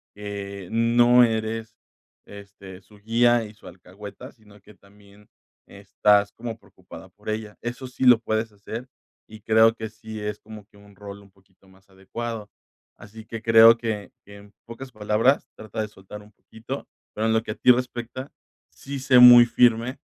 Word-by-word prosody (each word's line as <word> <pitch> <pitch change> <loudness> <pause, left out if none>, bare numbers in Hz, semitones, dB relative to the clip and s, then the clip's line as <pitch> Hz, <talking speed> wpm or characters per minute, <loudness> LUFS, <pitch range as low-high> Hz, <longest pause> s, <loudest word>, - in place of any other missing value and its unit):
que 100 -2 -8
no 120 +2 +4
eres, 110 0 -4 0.5
este, 100 -2 -13
su 105 +2 -21
guía 115 +2 +1
y 105 - -12
su 105 - -17
alcahueta, 100 +8 -12
sino 105 -3 -21
que 105 - -18
también 100 +1 -22 0.4
estás 100 +1 +1
como 115 -1 -8
preocupada - - -15
por - - -12
ella. 110 -1 -5
Eso 120 +2 -6
sí 125 +1 -4
lo 120 -3 +6
puedes 110 0 -3
hacer, 110 +5 -9 0.4
y 110 0 -14
creo 110 +1 +3
que 110 -1 -7
sí 110 0 -10
es 105 0 -5
como 105 -1 -13
que 105 - -24
un 100 -1 -19
rol 100 0 -11
un 100 -1 -21
poquito 95 0 -30
más 95 +1 -25
adecuado. 105 +3 -8 0.5
Así 110 +1 -14
que 115 -1 -8
creo 115 0 +7
que 110 -3 -5
que 100 0 -14
en 100 0 -18
pocas 130 +3 -10
palabras, 110 +5 0
trata 110 0 -7
de 105 - -4
soltar 105 +1 -13
un 105 - -20
poquito, 115 +7 -9 0.3
pero 110 +1 -2
en 110 - +1
lo 110 0 0
que - - -6
a - - -6
ti 125 - +4
respecta, 125 +1 -4 0.4
sí 140 0 -8
sé 130 -1 +4
muy 120 -1 +9
firme 120 +2 +1
110 Hz, 175 wpm, -23 LUFS, 100-115 Hz, 0.5 s, muy